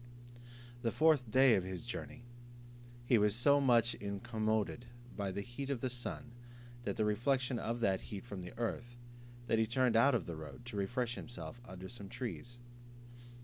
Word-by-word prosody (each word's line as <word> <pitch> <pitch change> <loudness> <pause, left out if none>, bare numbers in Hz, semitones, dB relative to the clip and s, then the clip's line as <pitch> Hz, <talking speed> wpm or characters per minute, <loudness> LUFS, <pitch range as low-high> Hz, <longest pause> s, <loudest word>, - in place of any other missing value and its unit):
The 115 -2 +1
fourth 155 -7 +4
day 130 +2 +6
of 95 - +3
his 95 +2 -5
journey, 125 +1 -6 0.8
he 120 -2 +5
was 105 0 +3
so 140 +4 +5
much 120 -3 +4
incommoded 110 +3 -2 0.3
by 100 -2 -2
the 100 +2 -3
heat 125 +5 -6
of 140 -3 0
the 130 - -1
sun, 125 +1 -5 0.5
and - - -2
the 110 - +1
reflection 125 +3 +1
of 120 +2 -2
that 95 -4 +2
heat 100 +2 -7
from 100 -6 -6
the 90 - -9
earth, 120 +1 -3 0.5
that 115 -1 +2
he 110 - +3
turned 125 0 +2
out 135 +4 +6
of 110 - 0
the 85 - -5
road, 80 +10 -9
to 120 - -7
refresh 120 +4 -1
himself 120 0 -7
under 95 0 -8
some 100 -3 -8
trees. 120 0 -5
120 Hz, 175 wpm, -35 LUFS, 105-125 Hz, 0.8 s, day